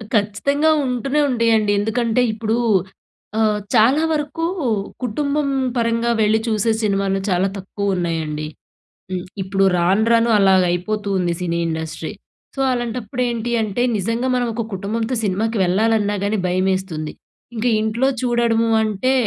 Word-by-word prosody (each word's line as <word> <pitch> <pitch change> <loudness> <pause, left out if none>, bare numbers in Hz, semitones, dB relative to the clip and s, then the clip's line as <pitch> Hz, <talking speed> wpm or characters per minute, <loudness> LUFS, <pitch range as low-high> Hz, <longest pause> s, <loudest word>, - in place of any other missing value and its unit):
ఖచ్చితంగా! 250 +9 +1 0.2
ఉంటూనే, 260 +3 -1
ఉంటాయండి. 225 -3 +2
ఎందుకంటే, 230 +3 +1
ఇప్పుడు 220 +1 -1 0.8
ఆహ్, 215 -1 +2 0.2
చాలా 250 +7 +4
వరకు 305 +2 -2 0.6
కుటుంబం 280 +4 -1 0.3
పరంగా 230 0 +1
వెళ్లి, 215 0 +3
చూసే 220 0 +1
సినిమాలు 195 -2 0
చాలా 185 0 +2
తక్కువ 195 0 -2
ఉన్నాయండి. 160 -3 -2 0.7
హ్మ్. 180 -1 -3 0.2
ఇప్పుడు 195 +1 0
రాను, 180 +5 +2
రాను 230 0 +4
అలాగా 190 -2 +4
అయిపోతూ 205 +3 -2
ఉంది, 175 -2 0
సినీ 170 -1 -1
ఇండస్ట్రీ. 160 0 -4 0.4
సో, 270 - -2
అలాంటప్పుడు 240 0 -3
ఏంటి 235 0 -3
అంటే, 215 +3 -1
నిజంగా 230 +6 -1
మనం 245 -1 +1
ఒక 230 0 -3
కుటుంబంతో 225 +6 -2
సినిమాకి 215 +4 0
వెళ్లాలన్నా 205 +3 +2
గాని, 210 +1 0
భయమేస్తుంది. 185 -4 -1 0.4
ఇంకా 230 +2 0
ఇంట్లో 230 +5 +1
చూడడము 235 -2 +1
అంటే, 215 +5 0
215 Hz, 130 wpm, -20 LUFS, 190-235 Hz, 0.8 s, చాలా